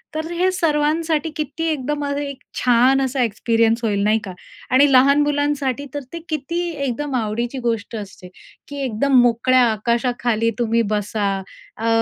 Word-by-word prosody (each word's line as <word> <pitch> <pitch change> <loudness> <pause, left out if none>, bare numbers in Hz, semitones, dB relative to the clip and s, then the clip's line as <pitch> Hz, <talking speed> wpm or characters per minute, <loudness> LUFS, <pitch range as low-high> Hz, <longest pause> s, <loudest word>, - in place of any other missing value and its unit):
तर 315 +1 -3
हे 365 +2 +3
सर्वांसाठी 320 -2 0
किती 305 +2 -3
एकदम 295 0 -2
अ, 285 - -2
एक 280 -2 -5 0.2
छान 250 +2 +4
असा 265 -1 0
एक्सपिरियन्स 230 +1 +1
होईल 205 -3 0
नाही 215 +2 +3
का? 195 - -6 0.4
आणि 275 +2 +5
लहान 280 +3 +5
मुलांसाठी 290 -2 0
तर 290 - -2
ते 335 - -4
किती 310 +2 -2 0.3
एकदम 275 +3 -3
आवडीची 235 +2 -2
गोष्ट 225 -1 -2
असते, 195 -3 -8 0.4
की 285 - -8
एकदम 255 +3 +2
मोकळ्या 245 +2 +3
आकाशाखाली 235 +1 0
तुम्ही 230 -1 +2
बसा. 210 0 -1 0.5
अ, 225 - -3
255 Hz, 150 wpm, -20 LUFS, 230-290 Hz, 0.5 s, आणि